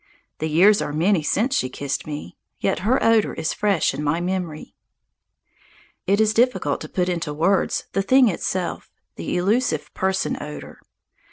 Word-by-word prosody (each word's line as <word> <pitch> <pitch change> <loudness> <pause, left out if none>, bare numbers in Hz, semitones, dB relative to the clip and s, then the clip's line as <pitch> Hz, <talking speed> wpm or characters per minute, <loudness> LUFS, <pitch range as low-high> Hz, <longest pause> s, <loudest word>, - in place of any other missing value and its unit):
The 155 - -2
years 195 +7 +5
are 145 - -3
many 170 +3 +2
since 220 - 0
she 130 - 0
kissed 140 +3 -4
me. 145 - -7 0.2
Yet - - 0
her 230 +8 +1
odour 225 -2 +3
is 160 0 -2
fresh 200 -9 +1
in 145 +2 -4
my 150 +3 0
memory. 175 -3 -4 1.3
It 200 +2 +3
is 215 0 +3
difficult 215 - +1
to 155 - -7
put 180 -1 -1
into 170 -4 -2
words 185 +5 +1
the 195 - 0
thing 255 +5 +5
itself, 185 -1 -3 0.3
the 85 - -3
elusive 210 +8 0
person 190 0 -1
odour. 150 0 -8
180 Hz, 160 wpm, -22 LUFS, 155-205 Hz, 1.3 s, years